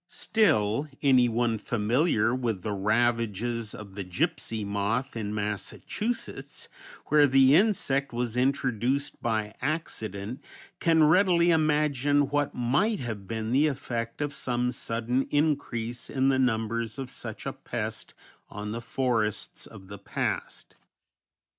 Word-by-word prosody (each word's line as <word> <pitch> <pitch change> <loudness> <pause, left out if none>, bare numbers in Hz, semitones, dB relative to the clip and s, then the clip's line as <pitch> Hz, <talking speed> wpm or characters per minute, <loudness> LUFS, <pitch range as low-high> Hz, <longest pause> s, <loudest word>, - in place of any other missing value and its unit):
Still, 140 - +1 0.2
anyone 120 -4 +3
familiar 115 +1 +1
with 115 -7 -2
the 110 - -2
ravages 115 +1 0
of 100 -2 -10
the 100 0 -5
gipsy 95 +4 -2
moth 105 +7 -1
in 105 -3 -3
Massachusetts, 105 - -4 0.4
where 150 -1 +6
the 135 0 +5
insect 155 -9 +2
was 120 -1 -2
introduced 130 +1 0
by 110 -2 -1
accident, 115 - -4 0.4
can 165 -1 +4
readily 175 +1 +5
imagine 150 -3 +2
what 145 0 0
might 170 - +1
have 110 -5 -5
been 110 +1 -3
the 140 +5 +4
effect 120 -3 -4
of 145 0 -1
some 125 0 -1
sudden 120 +2 -1
increase 135 -6 -1
in 135 0 +2
the 130 -1 +2
numbers 115 -1 0
of 135 -2 -5
such - - -7
a - - -2
pest - - -5 0.3
on 105 0 -6
the 115 +2 -4
forests 115 -5 -1
of 95 - -13
the 100 +1 -9
past. 100 - -4
120 Hz, 125 wpm, -27 LUFS, 110-140 Hz, 0.4 s, where